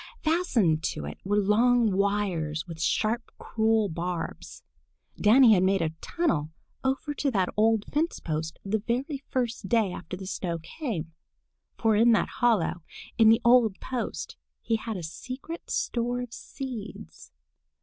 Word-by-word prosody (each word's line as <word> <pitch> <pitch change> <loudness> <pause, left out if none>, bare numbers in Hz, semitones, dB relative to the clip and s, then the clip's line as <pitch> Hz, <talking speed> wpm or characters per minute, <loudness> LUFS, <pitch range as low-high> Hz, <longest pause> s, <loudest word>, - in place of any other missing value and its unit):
Fastened 255 - +2
to 75 - -3
it 75 - -7
were 205 +2 0
long 225 +3 +3
wires 190 -6 0
with 165 -3 -8
sharp 225 +7 0
cruel 220 -1 +1
barbs. 170 -1 -5 0.5
Danny 230 +2 +6
had 185 - +4
made 190 -1 +2
a 160 - -1
tunnel 270 - 0 0.3
over 270 +3 -1
to 290 -1 0
that 195 -7 0
old 220 0 +3
fence 320 +3 -1
post 160 0 -3
the 215 +2 0
very 260 +6 -2
first 230 -6 -2
day 225 -5 +2
after 180 +1 -7
the 190 - -8
snow 180 -3 -3
came, 165 - -5 0.6
for 225 -1 +2
in 230 +2 +5
that 225 - +2
hollow 230 -7 +2 0.4
in 220 -1 +7
the 225 +1 +5
old 235 -5 +5
post 255 -2 -4 0.3
he 225 - +1
had 220 -1 -5
a 175 - -6
secret 255 - -7
store 245 +1 -1
of 245 -1 -7
seeds. 215 - -8
220 Hz, 150 wpm, -27 LUFS, 180-245 Hz, 0.6 s, in